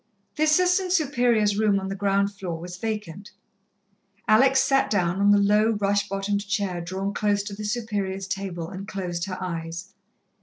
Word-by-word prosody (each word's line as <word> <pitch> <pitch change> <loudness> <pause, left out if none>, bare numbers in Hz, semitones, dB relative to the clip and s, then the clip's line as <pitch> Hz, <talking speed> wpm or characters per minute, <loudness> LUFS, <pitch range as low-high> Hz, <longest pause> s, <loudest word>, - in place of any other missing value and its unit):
The 310 - +2
Assistant 360 +4 +3
Superior's 245 - +2
room 210 -2 +3
on 190 - -5
the 195 - -3
ground 200 0 +1
floor 180 -4 -5
was 175 +1 -7
vacant. 210 -1 -5 1.0
Alex 265 +5 +5
sat 270 -1 +2
down 180 -2 0
on 200 - +4
the 205 - +6
low, 210 +2 +3
rush 205 0 0
bottomed 200 +1 -2
chair 200 -4 -1
drawn 190 +4 -3
close 205 -1 +1
to 200 -1 -6
the 210 - -7
Superior's 205 -4 -2
table, 185 -4 -4
and 195 +3 -8
closed 180 -4 -3
her 185 -2 -5
eyes. 170 +1 -5
200 Hz, 165 wpm, -25 LUFS, 190-215 Hz, 1.0 s, the